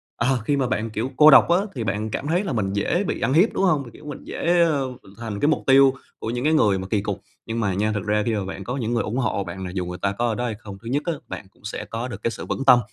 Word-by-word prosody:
ờ, 125 +2 +1
khi 145 -1 +1
mà 130 -2 +1
bạn, 115 -3 -1
kiểu, 115 +5 -3
cô 155 0 +9
độc 135 - +7
á 175 - +5 0.2
thì 120 - -2
bạn 105 +2 -2
cảm - - -3
thấy 175 +6 +1
là 190 - -3
mình 100 -4 -1
dễ 140 - 0
bị - - -3
ăn 125 +4 +1
hiếp, 180 +8 +4
đúng - - 0
hông? 155 -7 +3
Thì, - - -10
kiểu, 150 - -14
mình 145 - -7
dễ, 175 0 +1
ờ, 145 -5 +1 0.2
mình 95 - -16
thành 110 -3 -5
cái 145 - +2
mục 155 - +1
tiêu 135 0 +6 0.3
của 110 - -4
những 120 +2 -2
cái 155 - +3
người 105 -11 +3
mà 95 - -5
kì 105 0 0
cục. - - -4 0.2
Nhưng 115 +1 -3
mà 100 -4 0
nha, 105 +3 0
thực 105 -1 -3
ra 105 0 +1
khi 115 -2 0
mà 100 -2 -2
bạn 95 +1 -6
có 125 +6 -4
những 120 -2 -2
người 115 - +1
ủng 115 +5 -3
hộ 110 -5 0
bạn 95 0 -6
là 90 - -5
dù 90 -2 -2
người 90 0 -5
ta 100 - +1
có 120 +4 -1
ở 115 - 0
đó 125 - -2
hay 110 -3 -2
không, 100 -3 -9
thứ 115 - -10
nhất 145 +4 0
á 170 - 0
bạn - - -7
cũng - - -29
sẽ 105 - -5
có 115 +2 -4
được 120 - -8
cái 115 - +1
sự - - -7
vững 135 - -3
tâm, 125 -3 +8
115 Hz, 335 wpm, -23 LUFS, 105-140 Hz, 0.3 s, cô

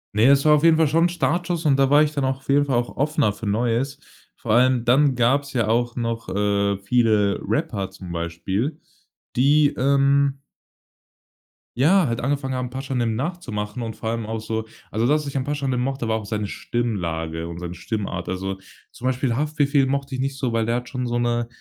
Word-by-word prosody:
Ne, 110 +2 +4
es 140 +1 +5
war 150 - +7
auf 150 0 +3
jeden 165 -1 +6
Fall 160 -1 +4
schon 165 +4 +3
'n 175 - +2
Startschuss 175 0 -1
und 145 -3 +4
da 135 -1 +3
war 145 +2 +6
ich 150 - 0
dann 140 -2 -1
auch 130 0 0
auf 135 - -23
jeden 145 +1 +3
Fall 135 -3 0
auch 120 0 -3
offener 145 -6 +1
für 105 +1 -7
Neues. 120 +6 0 0.4
Vor 115 - -4
allem, 125 0 +3
dann 135 +2 +4
gab's 135 +4 +1
ja 115 -4 +1
auch 120 +2 +1
noch, 115 -1 -3
äh, 100 0 +1
viele 105 -1 +2
Rapper 115 - -1
zum 95 -2 -10
Beispiel, 95 - -3 0.6
die, 145 +3 +4
ähm 140 +1 +2 1.4
ja, 175 +8 +4
halt 115 -1 -2
angefangen 135 0 -1
haben 125 -1 -3
„Pashanim“ 125 -3 -2
nachzumachen 125 - -4
und 110 -2 -5
vor 110 - -4
allem 115 -1 -3
auch 110 0 -3
so, 110 0 -4 0.2
also 115 +2 +1
das 150 +2 +2
ich 140 0 -6
an 130 - 0
„Pashanim“ 140 -3 -1
mochte, 130 -2 -2
war 110 0 +1
auch 110 - -6
seine 105 0 -2
Stimmlage 85 -10 -3
und 85 - -7
seine 85 0 -6
Stimmart. 95 -2 -4
Also, 95 +1 -3 0.3
zum 125 - -10
Beispiel 130 -2 0
„Haftbefehl“ 145 -1 +1
mochte 140 0 -2
ich 130 - -2
nicht 135 0 -2
so, 125 -4 -2
weil 115 -1 0
der 115 - +1
hat 120 0 -4
schon 125 -2 -3
so 120 0 -1
'ne, 120 -1 0
125 Hz, 205 wpm, -23 LUFS, 110-140 Hz, 1.4 s, war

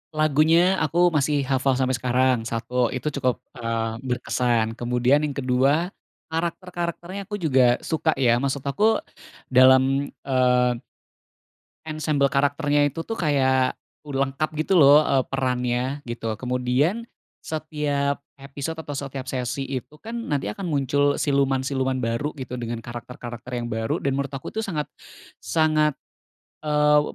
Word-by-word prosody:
Lagunya 155 +1 +4 0.3
aku 155 +3 -1 0.2
masih 145 0 +2
hafal 135 0 +2
sampai 130 -1 +1
sekarang, 125 0 +2
satu, 115 +1 -5 0.2
itu 130 - -4
cukup, 125 -2 +1 0.2
eee, 115 -1 -2
berkesan. 120 -2 +1
Kemudian 125 +3 +2
yang 150 -2 -2
kedua, 140 +7 +1 0.4
karakter-karakternya 175 +2 -3
aku 210 - -4
juga 130 -5 +4
suka, 160 -1 0
ya. 120 -3 +3
Maksud 140 0 -2
aku, 220 - +2 0.5
dalam, 130 +2 +5 0.2
eee 125 -2 +3 1.1
ensembel 155 -3 0
karakternya 145 +1 +2
itu 165 +4 -6
tuh 225 - -4
kayak 130 -5 +2 0.3
u 145 - -5
lengkap 140 +3 0
gitu 170 +4 +2
loh, 145 +1 +8
eee, 135 -3 +2
perannya 125 0 -1
gitu. 115 -1 -3
Kemudian 125 - 0 0.4
setiap 145 -3 -2 0.2
episode 140 +4 -6
atau 145 -3 -6
setiap 140 -1 -5
sesi 130 +1 -2
itu 130 +1 -5
kan 230 +1 -7 0.2
nanti 140 -7 0
akan 185 - -6
muncul 145 0 +2
siluman-siluman 135 -1 +1
baru 115 +5 -1
gitu, 125 -1 -5
dengan 120 -1 -4
karakter-karakter 120 0 -8
yang 120 - -4
baru, 110 0 -2
dan 135 -1 -1
menurut 140 0 -2
aku 135 - -5
tuh 220 - -2
sangat 150 -6 -3 0.6
sangat, 155 -2 +2 0.7
eee, 150 0 +4
135 Hz, 135 wpm, -24 LUFS, 125-150 Hz, 1.1 s, loh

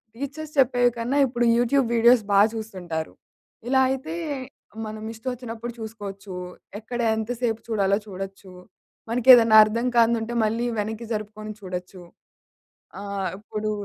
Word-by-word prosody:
Teachers 285 +4 -6
చెప్పేవి 245 -2 +4
కన్నా, 240 +4 -1
ఇప్పుడు 240 -1 0
యూట్యూబ్ 245 +2 +2
వీడియోస్ 235 0 +5
బా 200 - +5
చూస్తుంటారు. 185 -8 -5 0.5
ఇలా 265 +1 +3
అయితే, 270 +5 -3 0.7
మనం 215 0 -7
ఇష్టమోచ్చినప్పుడు 235 0 -6
చూసుకోవచ్చూ, 205 -3 -8 0.5
ఎక్కడ 240 +3 -6 0.2
ఎంత 220 0 -4
సేపు 230 -3 0
చూడాలో 200 -3 +1
చూడొచ్చు, 195 0 -8 0.6
మనకేదన్నా 235 -2 +7
అర్థం 230 +3 -2
కానిదుంటే, 230 0 +2
మళ్ళీ 225 +3 -1
వెనక్కి 220 +2 -4
జరుపుకొని 215 0 -6
చూడొచ్చు. 180 0 -7 1.0
ఆహ్, 200 -1 -3
ఇప్పుడూ 215 +1 -4
225 Hz, 115 wpm, -24 LUFS, 205-245 Hz, 1.0 s, మనకేదన్నా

